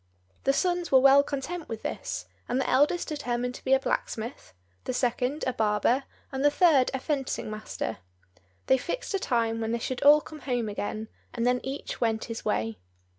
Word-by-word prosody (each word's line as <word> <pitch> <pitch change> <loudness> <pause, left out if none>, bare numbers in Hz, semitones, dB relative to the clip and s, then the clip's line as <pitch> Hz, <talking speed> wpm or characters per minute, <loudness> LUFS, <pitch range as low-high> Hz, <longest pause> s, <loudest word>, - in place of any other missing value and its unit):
The 275 - +5
sons 355 +2 0
were 265 - +8
well 275 +1 +7
content 300 +4 -5
with 225 -1 -5
this, - - -4 0.2
and 250 +2 +1
the 265 - 0
eldest 295 +6 +3
determined 250 -4 -2
to - - -11
be 265 - +2
a - - +2
blacksmith, 230 - -3 0.3
the 255 - -2
second 250 +3 0
a 255 - 0
barber, 225 +4 +2 0.3
and 265 0 -2
the 290 - +7
third 290 -4 +4
a - - -2
fencing 270 -6 -2
master. 215 - -4 0.7
They 265 - +4
fixed 380 - -4
a 390 - +1
time 230 -6 0
when 225 +1 -1
they - - +1
should 245 +2 -4
all 295 +1 +8
come 305 +1 -11
home 245 -5 -1
again, 215 +1 -4 0.3
and 235 -1 0
then 250 0 +3
each 270 +2 -5
went 225 -2 +1
his 230 -1 -6
way. 110 -1 -1
255 Hz, 190 wpm, -28 LUFS, 230-285 Hz, 0.7 s, were